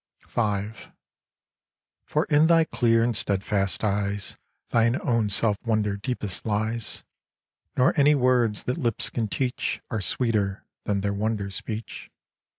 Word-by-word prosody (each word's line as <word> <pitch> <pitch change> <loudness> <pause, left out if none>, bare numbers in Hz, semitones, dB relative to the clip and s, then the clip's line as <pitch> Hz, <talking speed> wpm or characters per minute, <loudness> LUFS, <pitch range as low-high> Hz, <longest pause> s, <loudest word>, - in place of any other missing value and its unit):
V 105 -2 -1 1.3
For - - 0
in 150 +2 +4
thy 165 -1 +5
clear 115 -6 +2
and 120 -1 0
steadfast 100 0 0
eyes 100 -1 -1 0.3
Thine 115 +1 +2
own 115 -3 +1
self 105 +1 +3
wonder 110 -3 0
deepest 105 -3 -3
lies, 110 +1 -1 0.7
Nor 130 0 +4
any 145 +1 +5
words 125 -5 +2
that 125 +6 -2
lips 120 -7 0
can 115 -3 -1
teach 125 +3 -2
Are 110 -3 -1
sweeter 105 -1 0 0.2
than 100 -1 0
their 100 0 -1
wonder 105 -1 -2
speech. 110 +3 -6
110 Hz, 130 wpm, -25 LUFS, 100-120 Hz, 1.3 s, thy